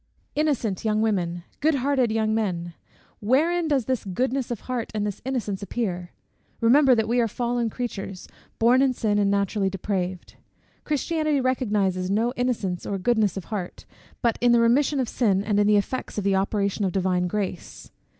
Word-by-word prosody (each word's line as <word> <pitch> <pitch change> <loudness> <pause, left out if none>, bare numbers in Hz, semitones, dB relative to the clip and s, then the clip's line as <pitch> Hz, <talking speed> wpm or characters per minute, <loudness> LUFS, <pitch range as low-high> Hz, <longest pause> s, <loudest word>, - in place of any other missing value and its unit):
Innocent 275 -10 0
young 215 0 +1
women! 175 -5 -1 0.2
Good 310 +1 +2
hearted 260 -3 +1
young 220 0 +1
men! 175 -6 -2 0.5
Wherein 320 +10 +2
does 275 -6 +1
this 260 -1 -1
goodness 255 +7 -1
of 240 -4 -4
heart 250 -3 -3
and 210 -1 0
this 205 -1 -4
innocence 235 -7 -3
appear? 190 -5 -3 0.5
Remember 255 +3 +5
that 220 -1 0
we 240 +2 +1
are 235 - +3
fallen 240 +1 -1
creatures, 200 -6 -5 0.3
born 240 +3 +4
in 270 -1 +3
sin, 210 -4 0
and 200 -1 +2
naturally 200 0 +1
depraved. 185 -1 -4 0.5
Christianity 310 0 0
recognises 205 -8 0
no 225 +5 +1
innocence 225 -8 -1
or 200 - -2
goodness 210 -1 +1
of 190 - -5
heart, 185 -4 -5 0.4
but 235 -2 +1
in 240 0 +5
the 235 - +5
remission 260 +5 +3
of 255 - 0
sin, 200 -6 +1
and 205 -1 +1
in 205 - +3
the 210 0 +5
effects 220 +5 -3
of 205 - -1
the 200 0 +2
operation 200 +1 0
of 190 - +1
divine 180 -1 0
grace. 190 -2 -5
220 Hz, 175 wpm, -25 LUFS, 195-250 Hz, 0.5 s, Remember